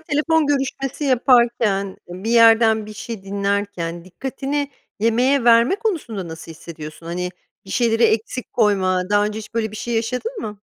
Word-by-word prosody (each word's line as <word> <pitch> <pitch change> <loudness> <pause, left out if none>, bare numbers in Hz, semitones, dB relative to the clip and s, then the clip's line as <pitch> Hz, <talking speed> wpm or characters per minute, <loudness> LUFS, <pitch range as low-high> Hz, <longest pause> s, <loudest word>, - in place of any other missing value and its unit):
telefon 315 +1 +1
görüşmesi 275 0 -2
yaparken, 235 -7 +2
bir 185 +5 -5
yerden 225 -2 +5
bir 215 - -9
şey 220 -1 -7
dinlerken, 200 -4 -2
dikkatini 270 +8 -4 0.3
yemeğe 245 +4 +2
verme 235 +8 +5
konusunda 305 - -3
nasıl 160 0 -9
hissediyorsun? 160 0 -10
Hani, 180 +1 -3 0.3
bir 195 - -12
şeyleri 230 0 +2
eksik 230 +3 0
koyma, 190 -5 +2
daha 205 0 +4
önce 210 +1 -3
hiç 215 0 -10
böyle 220 -2 -1
bir 215 - -8
şey 235 +2 -3
yaşadın 250 - -2
mı? 210 -1 -6
225 Hz, 150 wpm, -21 LUFS, 200-255 Hz, 0.3 s, yerden